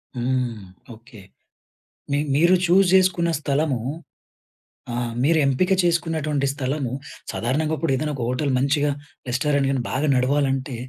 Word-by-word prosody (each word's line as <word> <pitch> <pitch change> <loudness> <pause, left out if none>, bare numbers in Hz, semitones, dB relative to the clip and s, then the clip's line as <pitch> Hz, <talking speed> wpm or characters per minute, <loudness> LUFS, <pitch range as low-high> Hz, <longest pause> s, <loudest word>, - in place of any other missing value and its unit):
హ్మ్. 125 -2 -1 0.4
ఓకే. 115 -1 -15 0.9
మీ 140 - +2 0.2
మీరు 170 +6 +5
చూ‌జ్ 185 +2 +4
చేసుకున్న 180 -2 +2
స్థలము 145 -2 0 1.2
ఆహ్, 120 -1 -2
మీరెంపిక 155 +4 +2
చేసుకున్నటువంటి 160 -5 0
స్థలము 135 -2 -3 0.4
సాధారణంగా 150 +6 -1
ఇప్పుడు 150 -5 0
ఏదన్నా 150 +3 -2
ఒక 125 - -4
హోటల్ 135 +3 -1
మంచిగా 145 +2 +1 0.4
రెస్టారెంట్ 140 +2 +1
గాని 135 -2 0
బాగా 145 +3 -1
నడవాలంటే 135 0 0
140 Hz, 115 wpm, -23 LUFS, 130-160 Hz, 1.2 s, మీరు